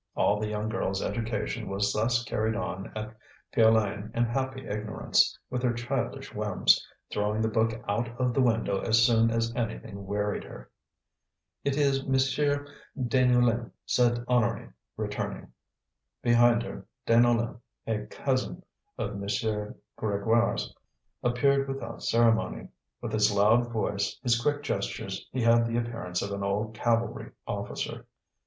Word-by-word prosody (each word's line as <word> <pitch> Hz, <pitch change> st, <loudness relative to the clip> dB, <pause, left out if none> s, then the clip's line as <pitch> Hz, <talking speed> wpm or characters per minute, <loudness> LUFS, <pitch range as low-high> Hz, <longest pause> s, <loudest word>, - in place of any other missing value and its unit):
All 105 Hz, -, +2 dB
the 105 Hz, -, -1 dB
young 105 Hz, 0 st, -2 dB
girl's 100 Hz, -3 st, -1 dB
education 115 Hz, -1 st, -2 dB
was 100 Hz, +1 st, 0 dB
thus 115 Hz, +2 st, +1 dB
carried 110 Hz, 0 st, -1 dB
on 95 Hz, -2 st, -4 dB
at 110 Hz, 0 st, -5 dB, 0.4 s
Piolaine 110 Hz, -4 st, +3 dB
in 120 Hz, +1 st, +3 dB
happy 130 Hz, +2 st, -3 dB
ignorance, 105 Hz, +1 st, +1 dB
with 125 Hz, -1 st, -1 dB
her 125 Hz, -1 st, +2 dB
childish 120 Hz, 0 st, -3 dB
whims, -, -, +3 dB, 0.3 s
throwing 105 Hz, +1 st, 0 dB
the 110 Hz, -, +2 dB
book 110 Hz, 0 st, +1 dB
out 115 Hz, +4 st, 0 dB
of 125 Hz, -1 st, +1 dB
the 135 Hz, -, +2 dB
window 110 Hz, -5 st, +2 dB
as 115 Hz, 0 st, +4 dB
soon 115 Hz, -1 st, +4 dB
as 115 Hz, 0 st, -1 dB
anything 110 Hz, -4 st, -4 dB
wearied 105 Hz, +1 st, -1 dB
her. -, -, -11 dB, 0.9 s
"It 140 Hz, 0 st, 0 dB
is 140 Hz, -2 st, +3 dB
M. 135 Hz, +2 st, +1 dB, 0.4 s
Deneulin," 120 Hz, -2 st, +3 dB, 0.2 s
said 120 Hz, -1 st, +2 dB
Honorine, 120 Hz, -, +1 dB, 0.2 s
returning. -, -, -4 dB, 0.7 s
Behind 120 Hz, 0 st, +5 dB
her, -, -, -8 dB, 0.2 s
Deneulin, 120 Hz, 0 st, +3 dB, 0.3 s
a 105 Hz, -2 st, -2 dB
cousin 135 Hz, +7 st, -2 dB, 0.3 s
of -, -, -2 dB
M. 100 Hz, -, -6 dB, 0.8 s
Grégoire's, 110 Hz, +3 st, +1 dB, 0.5 s
appeared 135 Hz, +3 st, +2 dB
without 135 Hz, -4 st, -5 dB
ceremony; 115 Hz, -1 st, +2 dB, 0.3 s
with -, -, -4 dB
his 105 Hz, -1 st, +4 dB
loud 110 Hz, +4 st, +4 dB
voice, 100 Hz, -3 st, -1 dB
his 120 Hz, -2 st, +2 dB
quick 145 Hz, +2 st, 0 dB
gestures, 145 Hz, -, -3 dB
he 130 Hz, -2 st, -1 dB
had 115 Hz, 0 st, +5 dB
the 115 Hz, 0 st, -1 dB
appearance 115 Hz, -7 st, -2 dB
of 100 Hz, -, -4 dB
an 100 Hz, 0 st, -3 dB
old 105 Hz, +3 st, -1 dB
cavalry 115 Hz, +1 st, 0 dB, 0.2 s
officer. -, -, -4 dB
115 Hz, 135 wpm, -28 LUFS, 105-120 Hz, 0.9 s, Behind